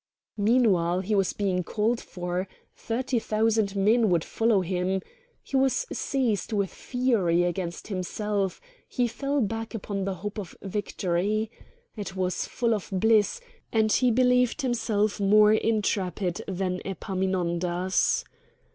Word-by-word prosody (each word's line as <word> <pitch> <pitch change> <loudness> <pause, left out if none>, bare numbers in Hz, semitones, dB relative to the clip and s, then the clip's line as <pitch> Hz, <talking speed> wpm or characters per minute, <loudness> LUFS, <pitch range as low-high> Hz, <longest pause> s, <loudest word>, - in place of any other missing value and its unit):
Meanwhile 200 -6 +3
he 200 +3 -2
was 195 -2 +2
being 185 -3 -1
called 225 +5 0
for; 180 +1 -4 0.3
thirty 245 +1 -1
thousand 215 -2 +1
men 215 +3 +3
would 170 -3 +2
follow 225 -3 +2
him; 185 +1 -1 0.4
he - - -6
was 270 - +2
seized 240 -7 -1
with 200 -3 0
fury 220 -10 +1
against 175 +2 -3
himself; 195 +1 -2 0.3
he 245 -2 +1
fell 275 +4 -1
back 225 +1 -3
upon 200 -2 -3
the 195 -1 -2
hope 205 +4 -5
of 190 -5 -8
victory; 205 +1 -1 0.4
it 200 -3 -6
was 185 -1 -1
full 235 -2 0
of 210 -3 -3
bliss, 220 - +3 0.3
and 220 -1 +2
he 250 +2 +4
believed 250 +3 +3
himself 220 -4 0
more 210 +1 +6
intrepid 200 -5 0
than 185 -1 -2
Epaminondas. 185 -2 0
205 Hz, 130 wpm, -27 LUFS, 185-225 Hz, 0.4 s, more